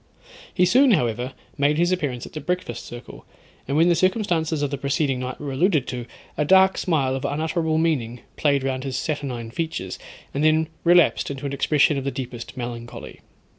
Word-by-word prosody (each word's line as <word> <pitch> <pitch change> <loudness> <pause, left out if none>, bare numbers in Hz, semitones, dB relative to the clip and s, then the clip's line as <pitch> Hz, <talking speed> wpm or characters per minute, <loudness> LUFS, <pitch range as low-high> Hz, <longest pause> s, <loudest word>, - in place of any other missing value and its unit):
He 180 - +3
soon, 250 +6 +5
however, 125 - 0 0.3
made 145 +1 +3
his 175 +2 +2
appearance 145 -9 -2
at - - -12
the 155 - -5
breakfast 160 -9 -3
circle, 120 +1 -10 0.4
and 140 +2 0
when 165 +2 +5
the 175 - +5
circumstances 170 -5 +1
of 145 - -1
the 140 - -2
preceding 140 -1 0
night 130 0 -5
were 145 -2 -5
alluded 155 0 +2
to, 125 -1 -5 0.3
a 150 - +1
dark 190 +4 +5
smile 140 -7 +1
of 135 - -4
unutterable 160 +2 0
meaning 130 -8 0
played 140 -3 +2
round 130 -1 -2
his 135 -2 -3
saturnine 130 -6 -3
features, 160 - -4 0.3
and 140 - -1
then 155 0 +3
relapsed 175 0 +4
into 140 0 -6
an 140 - -3
expression 145 +1 +3
of - - -6
the 140 - -1
deepest 125 -3 -7
melancholy. 120 -1 -7
145 Hz, 185 wpm, -23 LUFS, 130-165 Hz, 0.4 s, soon